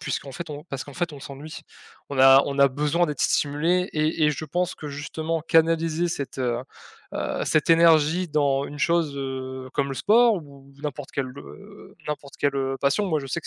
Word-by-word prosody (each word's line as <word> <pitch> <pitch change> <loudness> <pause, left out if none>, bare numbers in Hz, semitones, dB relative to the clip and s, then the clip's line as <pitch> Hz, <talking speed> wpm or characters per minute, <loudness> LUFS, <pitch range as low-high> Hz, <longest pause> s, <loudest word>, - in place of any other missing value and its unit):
puisqu'en 135 - -4
fait 170 +2 -7
on 150 0 -7
parce 135 -6 -6
qu'en 145 - -12
fait 175 -3 -2
on 140 - -10
s'ennuie. 140 +3 -9 0.5
On 140 - -4
a 135 +1 +8
on 140 0 -4
a 140 - +7
besoin 150 +6 +1
d'être 150 -3 -4
stimulés 165 +6 +1
et 155 0 +1
et 150 - +4
je 150 +1 -4
pense 175 +4 -1
que 150 - -7
justement 155 +3 -3
canaliser 165 +1 +2
cette 140 -5 -5
heu, 120 -2 0 0.6
heu, - - -2
cette 155 +2 +2
énergie 165 +1 +5
dans 140 -2 +1
une 145 +1 -8
chose 165 -4 +1
heu, 130 -1 -5
comme 140 -1 +1
le 135 - -4
sport 225 - +4
ou 140 -4 -12
n'importe 145 -1 -5
quelle, 135 -2 -2
heu, 200 +7 -13
n'importe 145 -2 -5
quelle 140 -1 0
heu, 135 0 -1
passion. 140 +9 +1
Moi 160 -5 0
je 135 - -7
sais - - -2
que - - -11
150 Hz, 205 wpm, -24 LUFS, 140-165 Hz, 0.6 s, a